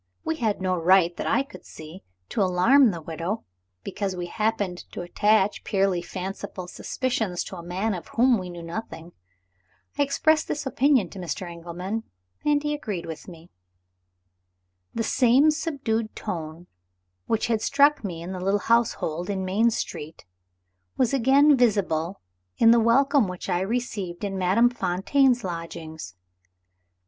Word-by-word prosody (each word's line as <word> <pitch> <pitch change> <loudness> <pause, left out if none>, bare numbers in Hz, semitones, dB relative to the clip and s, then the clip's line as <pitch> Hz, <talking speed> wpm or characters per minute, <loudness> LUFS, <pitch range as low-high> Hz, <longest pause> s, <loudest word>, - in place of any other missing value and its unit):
We 320 - -1
had 215 -7 -1
no 185 -1 +1
right, 175 0 +4
that - - -3
I 275 - +2
could 275 - -13
see, 160 +4 -11 0.3
to 215 - -1
alarm 225 +9 +5
the 170 -5 -5
widow, 170 +7 -4 0.4
because 200 -2 -3
we 175 -1 -4
happened 205 -2 -1
to - - -5
attach 205 +3 +2
purely 195 -3 +1
fanciful 185 +1 -6
suspicions 220 -3 -2
to 190 - -8
a - - -7
man 190 +5 -2
of 180 - -6
whom 240 -1 +3
we 180 -1 -6
knew 175 -1 -8
nothing. 165 -2 -7 0.9
I - - +4
expressed 310 +3 +2
this 295 0 -3
opinion 265 - +2
to 195 - -9
Mr. 180 +1 -4
Engelman; 175 +5 -5 0.4
and 295 -1 +2
he 295 0 -1
agreed 210 - -4
with 160 -1 -8
me. 170 -1 -13 1.4
The 230 - 0
same 255 +6 +4
subdued 275 -9 -2
tone 165 -4 -6 0.6
which 225 - +1
had 225 -2 0
struck 285 -1 +3
me 170 -4 -5
in 175 - -6
the 185 - -5
little 195 +2 +1
household 205 -7 0
in 190 -2 -2
Main 210 +5 +3
Street, 160 -7 -5 0.7
was 255 +1 +2
again 275 +3 +5
visible 195 -8 +1 0.4
in 230 - +6
the 235 - +6
welcome 270 +2 +3
which 180 0 -6
I 175 - +1
received 200 -4 -3
in 200 -1 -2
Madame 195 +6 +3
Fontaine's 245 +5 +1
lodgings. 165 - -7
200 Hz, 150 wpm, -25 LUFS, 175-240 Hz, 1.4 s, in